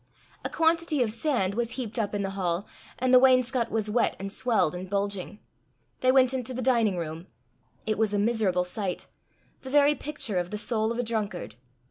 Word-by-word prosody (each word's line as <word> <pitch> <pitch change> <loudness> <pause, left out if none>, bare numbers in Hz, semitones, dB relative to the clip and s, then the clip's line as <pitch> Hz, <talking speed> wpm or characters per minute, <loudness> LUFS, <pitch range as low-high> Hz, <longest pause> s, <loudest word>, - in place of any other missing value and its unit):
A - - -2
quantity 325 -3 +2
of 220 - -2
sand 230 -5 0
was 235 +2 -2
heaped 240 -2 -4
up 210 -1 -1
in 200 - -1
the 195 - -2
hall, 185 -1 -2 0.3
and 255 0 +1
the 255 - +9
wainscot 255 -2 +3
was 220 -1 -1
wet 225 +3 +1
and 195 +1 -6
swelled 220 -7 +1
and 180 +1 -6
bulging. 200 0 -2 0.6
They 255 - +4
went 260 -1 +4
into 255 -1 -3
the 255 - -3
dining 230 -7 +2
room. 165 +1 -5 0.6
It 215 -1 -1
was 220 -2 +2
a 205 - 0
miserable 205 -4 +1
sight 180 0 -4 0.6
the 260 - -8
very 290 +1 +5
picture 285 -9 -3
of 175 0 -3
the 210 - -4
soul 220 0 0
of 235 - -3
a 245 - 0
drunkard. 210 - -3
220 Hz, 195 wpm, -27 LUFS, 195-255 Hz, 0.6 s, the